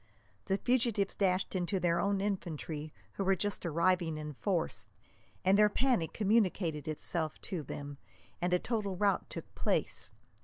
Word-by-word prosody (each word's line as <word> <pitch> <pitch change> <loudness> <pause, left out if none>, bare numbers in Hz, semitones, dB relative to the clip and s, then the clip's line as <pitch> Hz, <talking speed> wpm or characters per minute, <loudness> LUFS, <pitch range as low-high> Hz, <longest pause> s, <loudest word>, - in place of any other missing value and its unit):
The 195 -1 +1
fugitives 230 -5 +1
dashed 185 -1 +1
into 185 +1 0
their 170 -1 +2
own 200 -1 +1
infantry, 160 -6 -3 0.2
who - - -2
were 195 0 +3
just 200 -1 -1
arriving 170 0 +2
in 150 0 -5
force, 175 +3 -1 0.6
and 195 +2 +5
their 210 0 +7
panic 240 -8 +1
communicated 190 -7 +1
itself 155 +1 -1
to 180 -4 -2
them, 145 0 -7 0.4
and 175 +1 +1
a 180 - +5
total 205 -2 -2
rout 200 +1 +1
took - - -7
place. - - -1
185 Hz, 150 wpm, -33 LUFS, 165-200 Hz, 0.6 s, their